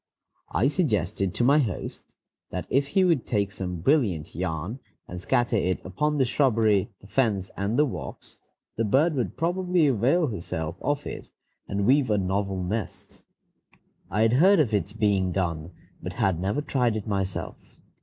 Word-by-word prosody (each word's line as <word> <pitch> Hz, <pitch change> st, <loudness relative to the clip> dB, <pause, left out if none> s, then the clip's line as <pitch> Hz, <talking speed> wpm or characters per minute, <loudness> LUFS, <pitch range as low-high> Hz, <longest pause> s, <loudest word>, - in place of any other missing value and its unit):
I 115 Hz, -, +1 dB
suggested 105 Hz, -, 0 dB
to -, -, +1 dB
my 140 Hz, +5 st, +5 dB
host 115 Hz, -10 st, -4 dB, 0.3 s
that -, -, -4 dB
if 140 Hz, +1 st, +2 dB
he 185 Hz, +7 st, +2 dB
would 170 Hz, -8 st, +2 dB
take 100 Hz, -3 st, 0 dB
some 90 Hz, -3 st, -5 dB
brilliant 100 Hz, -, +1 dB
yarn 90 Hz, -, -3 dB, 0.3 s
and 90 Hz, 0 st, -7 dB
scatter 120 Hz, +4 st, +1 dB
it 95 Hz, -2 st, 0 dB
about -, -, -9 dB
upon 150 Hz, +9 st, 0 dB
the 135 Hz, -, +3 dB
shrubbery, 115 Hz, -7 st, +2 dB
the -, -, -16 dB
fence, 100 Hz, -4 st, 0 dB
and 100 Hz, +4 st, -1 dB
the 150 Hz, -, +5 dB
walks, 135 Hz, -, -7 dB, 0.4 s
the 115 Hz, -, +1 dB
bird 140 Hz, +10 st, +3 dB
would 125 Hz, -5 st, -2 dB
probably 180 Hz, 0 st, +1 dB
avail 140 Hz, -, +3 dB
herself 85 Hz, -, -4 dB
of 145 Hz, 0 st, -1 dB
it, -, -, -7 dB, 0.4 s
and 100 Hz, 0 st, -1 dB
weave 130 Hz, +2 st, +4 dB
a 105 Hz, -, +2 dB
novel 95 Hz, 0 st, -1 dB
nest. 105 Hz, +4 st, -5 dB, 0.9 s
I 105 Hz, +3 st, +1 dB
had 115 Hz, +1 st, +3 dB
heard 185 Hz, +8 st, +5 dB
of 125 Hz, -8 st, +2 dB
its 100 Hz, -1 st, 0 dB
being 100 Hz, -4 st, +1 dB
done, 85 Hz, -3 st, -2 dB, 0.3 s
but -, -, -5 dB
had 95 Hz, -4 st, 0 dB
never 100 Hz, +10 st, -1 dB
tried 125 Hz, -6 st, +1 dB
it 110 Hz, -, -4 dB
myself. 95 Hz, -3 st, -4 dB
110 Hz, 170 wpm, -26 LUFS, 95-140 Hz, 0.9 s, my